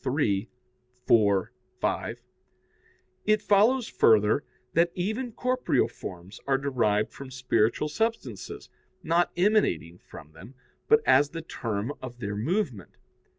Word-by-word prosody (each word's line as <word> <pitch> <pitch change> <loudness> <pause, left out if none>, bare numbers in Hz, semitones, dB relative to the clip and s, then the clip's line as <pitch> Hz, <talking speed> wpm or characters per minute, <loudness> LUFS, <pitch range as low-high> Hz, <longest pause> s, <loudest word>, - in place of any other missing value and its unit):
iii, 105 -6 0 0.6
4, 100 -4 +3 0.3
5), - - -2 1.1
it 215 0 +4
follows 220 +5 +3
further 110 +4 +3 0.3
that 170 +1 +3
even 220 +7 -2
corporeal 250 +2 +1
forms 90 +2 -9
are 135 -1 +3
derived 115 -6 0
from 135 -1 -9
spiritual 125 0 +1
substances, 225 +9 -3 0.4
not 170 +1 +2
emanating 175 - +1
from 75 - -13
them, 95 +12 -14 0.3
but 450 0 +5
as 145 0 +5
the 165 +1 -7
term 115 -3 -3
of 125 -2 -8
their 105 -4 -4
movement. 130 - -2
135 Hz, 115 wpm, -27 LUFS, -, 1.1 s, but